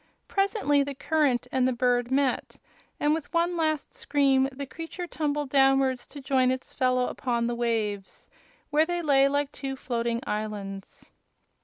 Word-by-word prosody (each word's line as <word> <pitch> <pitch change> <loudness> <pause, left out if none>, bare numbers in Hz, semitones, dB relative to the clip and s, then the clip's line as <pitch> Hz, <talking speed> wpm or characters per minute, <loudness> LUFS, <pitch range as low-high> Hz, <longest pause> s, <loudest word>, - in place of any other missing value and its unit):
Presently 390 -8 +2
the 280 0 -3
current 285 -4 +1
and 255 -1 +2
the 255 - +1
bird 245 0 +1
met, 265 -1 0 0.4
and 295 +1 +2
with 315 -2 -4
one 340 +1 +1
last 310 -3 -1
scream 270 -2 +2
the 280 +1 -6
creature 330 +5 -7
tumbled 295 -4 -2
downwards 270 -2 +3
to 290 - -10
join 265 -2 +2
its 260 0 -3
fellow 255 -1 +2
upon 235 -2 -1
the 240 - -1
waves, 220 -4 -2 0.4
where 310 +2 +3
they 350 -1 -2
lay 275 -3 +5
like 285 0 0
two 270 -1 -5
floating 235 -2 -2
islands. 205 -2 -5
270 Hz, 155 wpm, -27 LUFS, 245-295 Hz, 0.4 s, lay